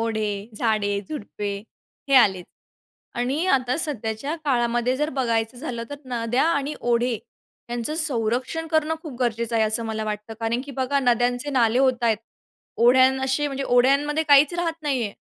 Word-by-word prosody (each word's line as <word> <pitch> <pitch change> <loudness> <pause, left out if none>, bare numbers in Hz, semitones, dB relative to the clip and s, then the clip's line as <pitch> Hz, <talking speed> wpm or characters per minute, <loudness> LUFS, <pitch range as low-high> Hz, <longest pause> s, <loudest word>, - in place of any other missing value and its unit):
ओढे, 220 -2 -1 0.3
झाडे, 205 -3 0
झुडपे 205 -7 -5 0.5
हे 275 - +3
आलेच 190 -7 +4 0.8
आणि 270 +8 0
आता 255 0 +1
सध्याच्या 275 -1 -1
काळामध्ये 240 -1 +1
जर 300 +1 0
बघायचं 230 -2 0
झालं, 245 -4 -5
तर 285 - -5
नद्या 245 0 0
आणि 285 -2 -1
ओढे 240 0 +1 0.5
यांचं 240 +5 -1
संरक्षण 260 +1 -1
करणं 315 0 +1
खूप 310 -5 -8
गरजेचं 235 -1 -1
आहे 220 - +3
असं 220 +2 0
मला 220 -1 -3
वाटतं 210 +1 -5
कारण 230 +2 -1
की 280 - -8
बघा 265 +1 0
नद्यांचे 245 +1 +1
नाले 245 -3 +2
होता 255 -3 +2
आहेत. 225 -2 +3 0.6
ओढ्यां 260 +2 +5
असे 270 +3 0
म्हणजे 275 -1 -4
ओढ्यांमध्ये 275 +5 +3
काहीचं 290 +1 +5
राहत 330 -1 -2
नाही 280 -4 0
आहे. 205 - -3
245 Hz, 155 wpm, -23 LUFS, 230-280 Hz, 0.8 s, ओढ्यां